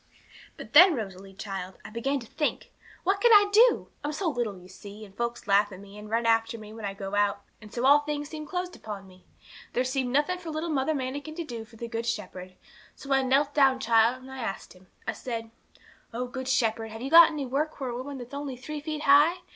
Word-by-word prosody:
'But - - -10
then, 345 +2 +9
Rosalie, 195 -4 -7
child, 190 -2 -6
I - - -9
began 270 +5 -1
to - - -10
think, 295 +6 -3 0.3
What 390 +2 +1
can 475 - +5
I 410 -1 +7
do? 470 +3 +5
I'm 295 - -2
so 330 +3 -1
little, 235 -7 -3
you 180 - -15
see, 205 +3 -11
and 195 -1 -18
folks 235 +1 -3
laugh 205 +1 +3
at 190 - -9
me, 200 0 -13
and 210 0 -10
run 230 +1 0
after 225 0 +2
me 215 -1 -11
when 220 -1 -7
I 195 -1 -4
go 195 0 -6
out; 205 0 +1 0.2
and 210 -1 -13
so 245 +1 -2
all 285 +2 +7
things 295 0 -4
seemed 305 -1 -7
closed 360 +2 -4
upon 205 -2 -8
me. 185 -1 -18 0.5
There 250 - +1
seemed 255 0 -1
nothing 300 +7 +1
for 340 -2 -8
little 315 +2 -3
Mother 290 +2 0
Manikin 285 +3 -4
to 340 - -4
do 235 -5 -7
for 225 - -18
the 235 +1 -6
Good 230 0 -4
Shepherd. 185 -4 -5 0.4
So 275 -1 -3
I 270 - +4
knelt 275 +2 +2
down, 270 -3 +4
child, 235 +1 +3
and 265 - -11
I 265 - -8
asked 195 -5 -5
Him. 185 0 -20 0.2
I - - -1
said 230 -2 -6 0.6
'"_Oh, 245 +2 -4
Good 260 0 -5
Shepherd, 225 -3 +1
have 225 +2 -8
you 270 - -4
got 335 0 +10
any 295 -3 -4
work 290 +5 -2
for 270 - -4
a 240 - -4
woman 270 +3 -6
that's 245 +1 -10
only 280 -2 -5
three 300 +4 -6
feet 305 0 -4
high? 300 +6 +5
250 Hz, 240 wpm, -27 LUFS, 215-290 Hz, 0.6 s, got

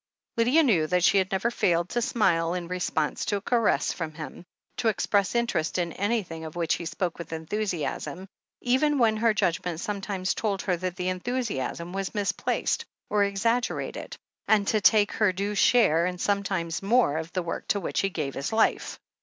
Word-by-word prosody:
Lydia 250 +7 +4
knew 180 - +3
that 180 +1 +1
she 195 - +5
had 190 0 -1
never 195 +5 0
failed 175 -5 +1
to 240 - -1
smile 175 -9 +1
in 175 -1 -4
response 175 -4 -1
to 205 - 0
a 200 - -2
caress 230 0 +1
from 160 -3 -5
him, 155 +2 -8 0.3
to 230 - 0
express 205 -1 +1
interest 235 -10 0
in 170 -2 -1
an)rthing 200 -6 -2
of 160 0 -8
which 170 -2 +1
he 170 - -3
spoke 175 0 -3
with 170 -2 -7
enthusiasm, 175 +1 -3 0.3
even 275 +4 +2
when 225 -4 +3
her 230 +1 +3
judgment 175 -4 -1
sometimes 195 -1 -2
told 200 -3 -2
her 185 - +1
that 180 0 -4
the 180 0 -2
enthusiasm 185 - -3
was 195 +2 -3
misplaced, 200 -2 0 0.3
or 210 -1 +3
exaggerated, 230 +5 -1 0.3
and 210 -2 +3
to 215 - +2
take 205 0 +5
her 210 -3 +2
due 200 +3 -2
share, 180 -6 +4
and 180 -1 -4
sometimes 195 -5 -1
more, 200 -7 +3
of 160 +1 -5
the 185 - -1
work 170 - -5
to 200 - +1
which 180 - -2
he 195 - +1
gave 150 -7 -3
his 140 - -3
life. 220 0 +1
195 Hz, 185 wpm, -26 LUFS, 170-215 Hz, 0.3 s, she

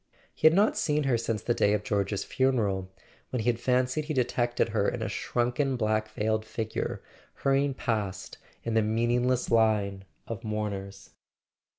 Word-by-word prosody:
He - - +4
had 160 - +5
not 205 +3 +4
seen 150 0 +1
her 135 -3 +2
since 115 -2 -2
the 120 - +1
day 105 -2 +3
of 105 -1 0
George's 100 -1 -1
funeral, 105 -8 0 0.4
when 125 - -2
he 115 - +1
had 115 - -7
fancied 130 +4 +1
he 155 -1 -3
detected 120 -2 +1
her 105 -2 +1
in 110 - -4
a - - -1
shrunken 125 +6 0
black 110 -2 0
veiled 110 0 -1
figure 110 0 -4 0.3
hurrying 135 0 +1
past 105 -7 -3 0.2
in 115 - -2
the 110 - +4
meaningless 120 +3 +1
line 105 -4 +2 0.2
of 115 0 -6
mourners. 105 -3 -4
115 Hz, 165 wpm, -28 LUFS, 105-125 Hz, 0.4 s, had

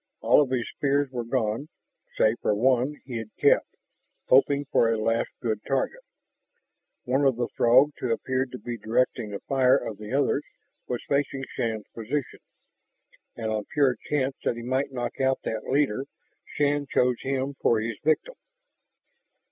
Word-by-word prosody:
All - - +5
of 140 - 0
his 125 -2 -1
spears 140 -1 0
were 120 -2 -3
gone, 115 +3 -1 0.5
save 110 +2 +3
for 105 - +1
one 130 +5 +2
he 125 -3 -5
had 110 -1 -7
kept, - - +3 0.5
hoping 140 +2 +4
for 115 -4 +3
a 115 - +1
last 115 +1 0
good 110 -3 -1
target. 140 - -1 1.0
One 135 +2 +1
of 135 -3 +4
the 120 +1 -1
Throgs 130 +5 +4
who 125 - -1
appeared 130 +2 -1
to - - -4
be 120 -2 -6
directing 115 +1 0
the 100 -1 -6
fire 130 -1 +3
of 110 -6 -6
the 105 +1 -8
others 140 +1 +1 0.4
was 125 - -4
facing 140 -1 0
Shann's 110 -2 -2
position. 125 +5 -4 1.0
And 110 -2 -3
on 105 -1 -2
pure 140 -4 +2
chance 135 -2 0
that - - 0
he 120 - -7
might 130 +3 -1
knock 120 0 -4
out 130 0 +2
that 110 -1 -4
leader, 135 -2 +1 0.4
Shann 145 0 0
chose 125 -1 +1
him 135 +1 -2
for 115 - +3
his 110 0 -4
victim. 155 - +1
130 Hz, 165 wpm, -26 LUFS, 115-140 Hz, 1.0 s, All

